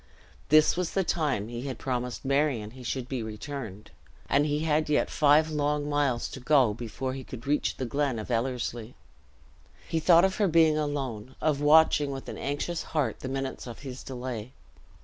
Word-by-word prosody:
This 155 0 +6
was 180 -2 -2
the 195 - +2
time 145 - 0
he 120 +3 -5
had 130 -3 -4
promised 125 -1 -3
Marion 135 -6 +1
he 130 +2 -12
should 125 0 -3
be 130 -2 -3
returned, 110 -1 -7 0.4
and 145 +2 +3
he 150 0 0
had 155 -1 +1
yet 150 - +1
five 155 +2 +4
long 145 -1 0
miles 145 -5 0
to - - -8
go, 130 -4 +4
before 120 +3 -4
he 135 0 -6
could 125 -2 -9
reach 145 +2 0
the 130 - -2
glen 140 0 -1
of 110 +3 -6
Ellerslie; 120 -1 -2 0.9
he 165 - 0
thought 170 +2 +6
of 190 - -1
her 205 - +3
being 160 -2 +4
alone 135 -6 -3
of 150 -2 0
watching, 150 -1 +5
with 135 -1 -6
an - - -6
anxious 145 +4 -2
heart, 140 -9 -2
the 130 - -5
minutes 135 -1 -4
of 120 - -9
his 130 -2 -7
delay. 125 -2 -6
135 Hz, 185 wpm, -28 LUFS, 125-150 Hz, 0.9 s, This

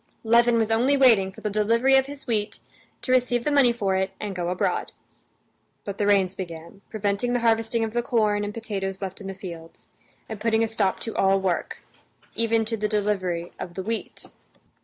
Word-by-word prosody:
Levin 235 +1 +4
was 225 -1 +1
only 255 +6 +3
waiting 225 -8 +5
for - - -14
the 210 - -2
delivery 230 +6 +3
of 265 0 +3
his 285 0 -8
wheat 215 -4 -2 0.4
to 255 - -2
receive 245 -1 +2
the 295 - 0
money 275 -4 +5
for 200 -5 -1
it 190 +1 0
and 205 -2 -5
go 175 -1 -2
abroad. 180 - -1 0.9
But 200 -1 -6
the 205 - +1
rains 195 -2 +3
began, 170 0 -8
preventing 210 +3 -1
the 245 - 0
harvesting 225 0 +1
of 220 -1 -3
the 240 - +1
corn 215 -4 +1
and 205 - -3
potatoes 195 -4 -4
left 190 0 -6
in 195 - -7
the 195 - -6
fields, 170 -4 -10 0.4
and 220 -2 -7
putting 225 0 +2
a - - +1
stop 210 -4 0
to 225 - -5
all 195 0 +3
work, 185 -3 -2 0.5
even 230 -1 +1
to 225 +1 -3
the 210 0 -1
delivery 195 -5 -1
of 175 - -7
the 190 - -4
wheat. 225 +3 -5
210 Hz, 200 wpm, -25 LUFS, 195-230 Hz, 0.9 s, waiting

